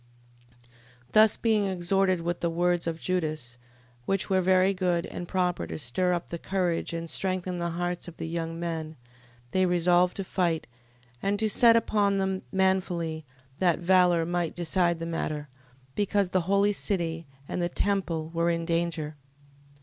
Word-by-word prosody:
15:17. 120 Hz, 0 st, -28 dB, 0.3 s
Thus 215 Hz, 0 st, +6 dB
being 220 Hz, -3 st, +2 dB
exhorted 185 Hz, 0 st, +1 dB
with 170 Hz, +1 st, -2 dB
the 170 Hz, -, 0 dB
words 175 Hz, +1 st, 0 dB
of 165 Hz, -1 st, -2 dB
Judas, 155 Hz, -10 st, -2 dB, 0.5 s
which 195 Hz, 0 st, -1 dB
were 190 Hz, 0 st, +4 dB
very 185 Hz, +1 st, +4 dB
good, 180 Hz, -2 st, 0 dB
and 175 Hz, -, -7 dB
proper 180 Hz, -1 st, -1 dB
to -, -, -5 dB
stir 155 Hz, +7 st, 0 dB
up 175 Hz, -1 st, -4 dB
the 170 Hz, -, -4 dB
courage, 180 Hz, -3 st, -1 dB
and 165 Hz, 0 st, -4 dB
strengthen 185 Hz, 0 st, -2 dB
the 170 Hz, 0 st, -1 dB
hearts 175 Hz, 0 st, -3 dB
of 170 Hz, -, -10 dB
the -, -, -4 dB
young 165 Hz, 0 st, -4 dB
men, 160 Hz, -2 st, -4 dB, 0.6 s
they 185 Hz, 0 st, +2 dB
resolved 180 Hz, +1 st, +3 dB
to 195 Hz, -, -2 dB
fight, 175 Hz, -3 st, -1 dB, 0.6 s
and 200 Hz, +1 st, 0 dB
to 220 Hz, +1 st, +1 dB
set 230 Hz, +2 st, +6 dB
upon 205 Hz, -3 st, +2 dB
them 190 Hz, -1 st, -1 dB
manfully: 180 Hz, -4 st, 0 dB, 0.3 s
that 175 Hz, -3 st, +3 dB
valour 175 Hz, -1 st, +4 dB
might 175 Hz, -1 st, -2 dB
decide 175 Hz, 0 st, +1 dB
the 165 Hz, -, -5 dB
matter, 155 Hz, -3 st, -3 dB, 0.4 s
because 200 Hz, 0 st, 0 dB
the 185 Hz, -, +2 dB
holy 200 Hz, +1 st, +3 dB
city, 170 Hz, -6 st, -2 dB, 0.2 s
and -, -, -3 dB
the 175 Hz, -, 0 dB
temple 175 Hz, -5 st, -1 dB
were 170 Hz, 0 st, +1 dB
in 165 Hz, 0 st, -1 dB
danger. 165 Hz, -3 st, -2 dB
175 Hz, 165 wpm, -27 LUFS, 165-190 Hz, 0.6 s, Thus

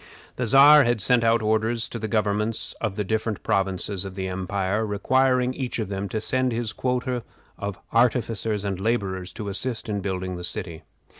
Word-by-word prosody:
The 125 Hz, -, -2 dB
Czar 145 Hz, +4 st, +8 dB
had 120 Hz, -2 st, +1 dB
sent 120 Hz, +4 st, +3 dB
out 115 Hz, 0 st, +3 dB
orders 110 Hz, +2 st, +1 dB
to 115 Hz, -, -5 dB
the 110 Hz, -, -3 dB
governments 105 Hz, +1 st, 0 dB
of 110 Hz, -4 st, -2 dB
the 105 Hz, -, -1 dB
different 110 Hz, +1 st, -2 dB
provinces 95 Hz, 0 st, 0 dB
of 95 Hz, -1 st, -7 dB
the 95 Hz, -1 st, -3 dB
empire 95 Hz, +3 st, -1 dB
requiring 125 Hz, +5 st, +2 dB
each 130 Hz, -2 st, -4 dB
of 110 Hz, -4 st, -3 dB
them 100 Hz, 0 st, -3 dB
to 110 Hz, -, -2 dB
send 130 Hz, +3 st, 0 dB
his 115 Hz, -1 st, -2 dB
quota 125 Hz, -1 st, -1 dB, 0.4 s
of 100 Hz, -1 st, -4 dB, 0.2 s
artificers 115 Hz, -3 st, +1 dB
and 95 Hz, -2 st, -2 dB
laborers 95 Hz, -5 st, -1 dB
to 105 Hz, -, -6 dB
assist 110 Hz, +4 st, -3 dB
in 105 Hz, -2 st, -2 dB
building 95 Hz, -1 st, -3 dB
the 90 Hz, -, -7 dB
city. 85 Hz, -2 st, -1 dB
110 Hz, 180 wpm, -24 LUFS, 95-120 Hz, 0.4 s, Czar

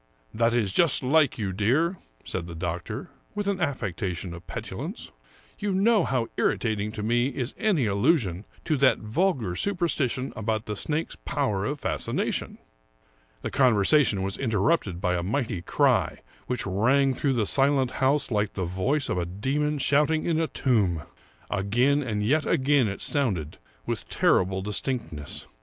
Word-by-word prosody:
That 115 Hz, +1 st, +2 dB
is 105 Hz, -6 st, 0 dB
just 165 Hz, -, +3 dB
like 145 Hz, +1 st, +3 dB
you, 100 Hz, -4 st, -2 dB
dear," 140 Hz, -, +1 dB, 0.3 s
said 85 Hz, -2 st, -4 dB
the 85 Hz, -, -8 dB
doctor, 85 Hz, 0 st, -4 dB, 0.2 s
with 205 Hz, -1 st, -2 dB
an 195 Hz, -2 st, -1 dB
affectation 95 Hz, -, -3 dB
of 85 Hz, +1 st, -11 dB
petulance. -, -, -6 dB, 0.2 s
" -, -, -29 dB
You 205 Hz, -1 st, -1 dB
know 205 Hz, 0 st, +3 dB
how 125 Hz, -4 st, -1 dB
irritating 105 Hz, -2 st, 0 dB
to 105 Hz, -, -5 dB
me 120 Hz, +3 st, +2 dB
is 130 Hz, -2 st, -3 dB
any 200 Hz, -, +1 dB
allusion 100 Hz, -, +1 dB, 0.2 s
to 155 Hz, -, 0 dB
that 135 Hz, -1 st, +4 dB
vulgar 115 Hz, -, -1 dB
superstition 155 Hz, -, -1 dB
about 110 Hz, 0 st, -2 dB
the 105 Hz, -, -4 dB
snake's 155 Hz, +9 st, -2 dB
power 120 Hz, -9 st, -1 dB
of 145 Hz, 0 st, -3 dB
fascination." -, -, -2 dB, 0.9 s
The -, -, -3 dB
conversation 120 Hz, -3 st, +4 dB
was 95 Hz, 0 st, -3 dB
interrupted 110 Hz, -, 0 dB
by 90 Hz, -2 st, +1 dB
a 85 Hz, -, -1 dB
mighty 110 Hz, -1 st, -2 dB
cry -, -, +1 dB, 0.3 s
which 125 Hz, -2 st, -2 dB
rang 130 Hz, +8 st, +2 dB
through 135 Hz, +1 st, 0 dB
the 115 Hz, -4 st, +1 dB
silent 135 Hz, +1 st, +2 dB
house 135 Hz, +1 st, +2 dB
like 105 Hz, -2 st, 0 dB
the 95 Hz, -, -2 dB
voice 125 Hz, -, 0 dB
of 90 Hz, -, -1 dB
a 85 Hz, -, -1 dB
demon 140 Hz, +11 st, -1 dB
shouting 150 Hz, +3 st, +2 dB
in 165 Hz, -2 st, +1 dB
a 165 Hz, -, +1 dB
tomb. 100 Hz, -, +1 dB, 0.5 s
Again 120 Hz, +9 st, +2 dB
and 105 Hz, -6 st, -2 dB
yet 150 Hz, +8 st, +2 dB
again 140 Hz, -5 st, +3 dB
it 100 Hz, -, -4 dB
sounded, 95 Hz, -, 0 dB, 0.3 s
with -, -, -4 dB
terrible 95 Hz, +1 st, +2 dB
distinctness. 100 Hz, -, -3 dB
120 Hz, 155 wpm, -26 LUFS, 100-145 Hz, 0.9 s, that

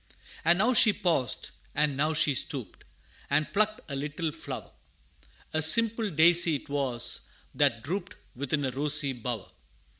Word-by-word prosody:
And 170 Hz, +2 st, +4 dB
now 225 Hz, +7 st, +2 dB
she 220 Hz, -2 st, +6 dB
paused, 160 Hz, -, -1 dB, 0.2 s
and 145 Hz, -1 st, +1 dB
now 155 Hz, +3 st, 0 dB
she 150 Hz, -1 st, +3 dB
stooped, 125 Hz, -6 st, -3 dB, 0.4 s
And 150 Hz, +2 st, 0 dB
plucked 215 Hz, +1 st, 0 dB
a 140 Hz, -, -5 dB
little 150 Hz, +3 st, -3 dB
flower -, -, -8 dB, 0.8 s
A 155 Hz, -, +1 dB
simple 225 Hz, +6 st, +4 dB
daisy 170 Hz, -1 st, +5 dB
'twas, 135 Hz, -4 st, -3 dB, 0.3 s
that 115 Hz, -1 st, +1 dB
drooped 190 Hz, +6 st, -4 dB, 0.2 s
Within 140 Hz, +2 st, -2 dB
a 130 Hz, -, -2 dB
rosy 145 Hz, +1 st, +1 dB
bower. 120 Hz, -3 st, -6 dB
150 Hz, 140 wpm, -28 LUFS, 135-175 Hz, 0.8 s, she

